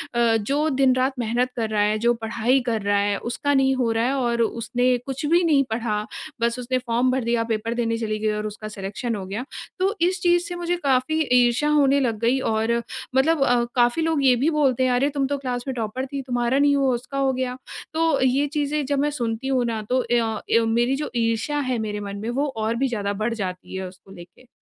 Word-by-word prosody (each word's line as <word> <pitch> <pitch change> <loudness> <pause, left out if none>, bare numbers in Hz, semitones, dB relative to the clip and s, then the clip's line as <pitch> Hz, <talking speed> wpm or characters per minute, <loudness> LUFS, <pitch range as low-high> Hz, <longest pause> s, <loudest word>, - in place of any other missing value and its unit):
अ, 235 -1 +3
जो 285 +9 0
दिन-रात 260 -1 +2
मेहनत 240 +2 0
कर 225 -2 -2
रहा 210 -1 +1
है, 210 +1 +2
जो 235 +1 +3
पढ़ाई 230 +3 0
कर 225 -3 0
रहा 200 0 +1
है 200 0 +1
उसका 285 +4 -1
नहीं 270 -1 +3
हो 245 -3 +1
रहा 225 +1 +1
है 265 - 0
और 240 -3 0
उसने 245 +2 +1
कुछ 270 +2 -4
भी 340 +4 +3
नहीं 295 -4 +4
पढ़ा, 215 -2 -1 0.4
बस 235 +1 0
उसने 255 +1 -1
फॉर्म 245 0 +1
भर 260 -1 0
दिया 235 0 +1
पेपर 225 +2 -2
देने 230 -1 -1
चली 215 -2 -2
गई 215 0 0
और 210 0 -2
उसका 215 +1 -7
सिलेक्शन 205 +4 -4
हो 195 -2 -5
गया। 205 +7 -5 0.3
तो 390 +3 +1
इस 360 +1 +2
चीज़ 350 -1 +3
से 355 - -5
मुझे 350 0 -1
काफ़ी 270 +3 +1
ईर्षा 245 +3 +3
होने 280 -2 +4
लग 230 -5 -1
गई। 240 +4 +2
और 230 -1 0 0.3
मतलब 275 +2 +3
अ, 245 -2 +3
काफ़ी 240 +5 +3
लोग 320 -3 +1
ये 255 -2 +6
भी 275 +7 +1
बोलते 275 -5 +2
हैं 255 - +2
अरे 255 +3 +2
तुम 280 -2 -1
तो 285 +1 -1
क्लास 250 -3 -3
में 265 - -1
टॉपर 235 +3 -3
थी 275 +1 -5
तुम्हारा 245 0 0
नहीं 285 0 +4
हुआ, 270 -2 +2
उसका 255 +3 -6
हो 270 -1 +2
गया। 255 -1 -3 0.4
तो 325 -2 +1
ये 265 +3 +2
चीज़ें 295 0 0
जब 280 0 0
मैं 295 - +2
सुनती 235 -1 -3
हूँ 255 -2 +1
ना 225 -2 -2
तो 255 0 +2
य 240 - +4 0.4
अ, - - 0
मेरी 240 +3 +1
जो 295 +2 -4
ईर्षा 230 +5 0
है 250 - 0
मेरे 210 0 -4
मन 200 0 -6
में 225 - -3
वो 280 +4 0
और 220 +1 -1
भी 265 +3 +1
ज़्यादा 205 -4 -2
बढ़ 235 - 0
जाती 185 -4 -5
है 190 0 -4
उसको 185 +1 -15
लेके। 175 +8 -14
245 Hz, 235 wpm, -23 LUFS, 225-275 Hz, 0.4 s, ये